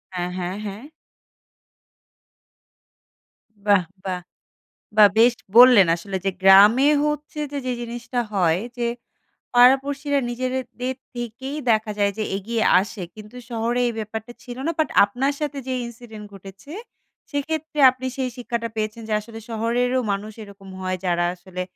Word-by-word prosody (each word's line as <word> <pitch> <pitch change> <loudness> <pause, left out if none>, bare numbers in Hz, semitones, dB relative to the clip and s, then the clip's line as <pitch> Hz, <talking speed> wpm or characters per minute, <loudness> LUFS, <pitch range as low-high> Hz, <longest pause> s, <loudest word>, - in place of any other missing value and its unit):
হ্যাঁ, 175 0 -2
হ্যাঁ, 180 0 -3
হ্যাঁ। 205 +3 -7 2.8
বাহ! 200 -3 +4 0.2
বাহ! 180 -1 -3 0.8
বাহ! 210 -1 +8
বেশ 235 +2 +6 0.2
বললেন 245 -6 +9
আসলে 190 +3 -5
যে 195 - +2
গ্রামে 205 +8 +7 0.2
হচ্ছে 300 0 -3
যে, 285 - -3
যে 255 - 0
জিনিসটা 240 +1 -4
হয় 175 -3 +2 0.2
যে, 240 -1 -1 0.7
পাড়া-পড়শিরা 275 +3 +4
নিজেদের 255 +1 -2 0.2
দের 260 +1 -2 0.2
থেকেই 245 +4 -6
দেখা 220 -1 +2
যায় 200 -1 +2
যে, - - 0
এগিয়ে 220 +3 -2 0.2
আসে। 205 0 -6
কিন্তু 215 +2 -12
শহরে 235 +1 -1
এই - - -2
ব্যাপারটা 220 +2 -6
ছিল 245 -3 -9
না। 335 - +1
বাট 315 - +2 0.2
আপনার 250 +8 -1
সাথে 295 -2 -3
যে 260 - -2
ইনসিডেন্ট 225 -2 -11
ঘটেছে, 195 +8 -12 0.6
সেক্ষেত্রে 310 +1 -3
আপনি 260 0 -7
সেই 260 -1 -1
শিক্ষাটা 235 -2 -3
পেয়েছেন 215 +1 -3
যে, - - -3
আসলে 225 +1 -11
শহরেরও 240 +3 0
মানুষ 205 +2 -4
এরকম 200 -1 -13
হয়, 185 0 -2
যারা 175 -1 +1
আসলে 185 +1 -7
230 Hz, 140 wpm, -22 LUFS, 200-255 Hz, 2.8 s, বললেন